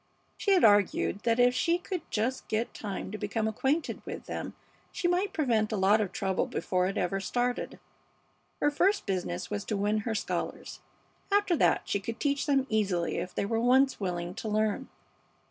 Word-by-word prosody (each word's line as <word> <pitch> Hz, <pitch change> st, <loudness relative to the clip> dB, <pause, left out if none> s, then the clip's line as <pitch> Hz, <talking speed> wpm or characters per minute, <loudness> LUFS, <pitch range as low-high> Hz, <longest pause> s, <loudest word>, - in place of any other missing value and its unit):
She 400 Hz, -, +2 dB
had 370 Hz, -, +4 dB
argued 205 Hz, -1 st, +4 dB
that 230 Hz, 0 st, +2 dB
if 245 Hz, 0 st, +5 dB
she 335 Hz, +6 st, +2 dB
could 360 Hz, 0 st, -4 dB
just 240 Hz, +4 st, -1 dB
get 220 Hz, +2 st, -1 dB
time 195 Hz, -2 st, -5 dB
to 215 Hz, -, -5 dB
become 215 Hz, +1 st, -1 dB
acquainted 270 Hz, +9 st, -1 dB
with -, -, -7 dB
them -, -, -5 dB, 0.4 s
she 350 Hz, -, -1 dB
might 365 Hz, +3 st, +1 dB
prevent 230 Hz, -, +1 dB
a 215 Hz, -, -1 dB
lot 200 Hz, +3 st, +4 dB
of 195 Hz, -3 st, -2 dB
trouble 190 Hz, -1 st, -1 dB
before 180 Hz, -1 st, 0 dB
it 195 Hz, -, -3 dB
ever 195 Hz, +2 st, 0 dB
started. 245 Hz, +5 st, -2 dB, 0.8 s
Her 295 Hz, -, +2 dB
first 390 Hz, +7 st, +2 dB
business 180 Hz, -, -3 dB
was 100 Hz, -1 st, -2 dB
to 210 Hz, -, -2 dB
win 210 Hz, +2 st, +1 dB
her 220 Hz, +1 st, -2 dB
scholars. -, -, -4 dB, 0.5 s
After 405 Hz, -3 st, +3 dB
that -, -, +3 dB
she 200 Hz, -, 0 dB
could 225 Hz, +3 st, -6 dB
teach 280 Hz, 0 st, 0 dB
them 275 Hz, -2 st, +3 dB
easily 195 Hz, -7 st, 0 dB
if 180 Hz, -, -6 dB
they -, -, 0 dB
were 225 Hz, +2 st, 0 dB
once 260 Hz, +3 st, +4 dB
willing 175 Hz, -3 st, -3 dB
to 215 Hz, -, -5 dB
learn. 215 Hz, +5 st, 0 dB
220 Hz, 185 wpm, -29 LUFS, 200-270 Hz, 0.8 s, if